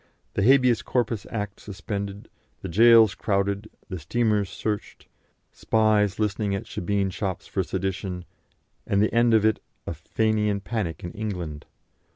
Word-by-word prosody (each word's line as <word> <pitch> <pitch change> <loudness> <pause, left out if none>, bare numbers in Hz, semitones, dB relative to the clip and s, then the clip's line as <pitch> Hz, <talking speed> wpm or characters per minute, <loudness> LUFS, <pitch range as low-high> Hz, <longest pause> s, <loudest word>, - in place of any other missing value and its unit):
The - - 0
Habeas 125 0 +5
Corpus 115 -4 -1
Act 105 -2 -4
suspended, 100 0 -5 0.4
the - - -4
gaols 110 +2 +7
crowded, 100 0 -1 0.2
the 95 -3 -5
steamers 105 +3 +1
searched, 105 -2 -4 0.4
spies 110 -3 +2
listening 105 -1 0
at 100 - -4
shebeen 100 +1 -1
shops 95 -1 -3
for - - -1
sedition, 95 -2 -3 0.6
and 100 - +2
the 105 - +2
end 115 -1 +4
of 110 -1 +4
it 110 -1 +3 0.3
a - - -3
Fenian 105 +5 0
panic 100 -6 -3
in 85 - -5
England. 90 -9 -5
105 Hz, 140 wpm, -25 LUFS, 95-110 Hz, 0.6 s, gaols